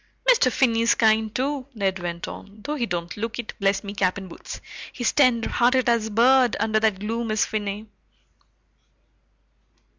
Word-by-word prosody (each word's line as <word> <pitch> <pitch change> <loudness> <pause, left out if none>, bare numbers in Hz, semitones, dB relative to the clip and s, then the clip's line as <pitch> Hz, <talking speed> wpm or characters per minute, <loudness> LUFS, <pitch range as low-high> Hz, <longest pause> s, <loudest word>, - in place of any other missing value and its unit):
"Mr. 445 - +5
Finney's 230 -2 +2
kind, 220 -1 +2
too," 275 0 -2
Ned 190 -3 -1
went 170 0 -5
on, 200 +2 -10
"though 295 - -3
he 250 -6 -2
don't 175 -2 -4
look 230 +2 -4
it, 240 -3 -6
bless 195 0 +1
me 200 0 -6
cap 190 -2 0
and 190 -2 -8
boots! - - -9 0.3
He's 245 - -1
tenderhearted 250 -1 +2
as 230 -2 +2
a - - -6
bird, 245 +2 +4
under 215 0 +1
that 215 -3 +1
gloom, 225 +2 -3
is 215 -1 +1
Finney." 210 0 -4
220 Hz, 160 wpm, -24 LUFS, 200-240 Hz, 0.3 s, Mr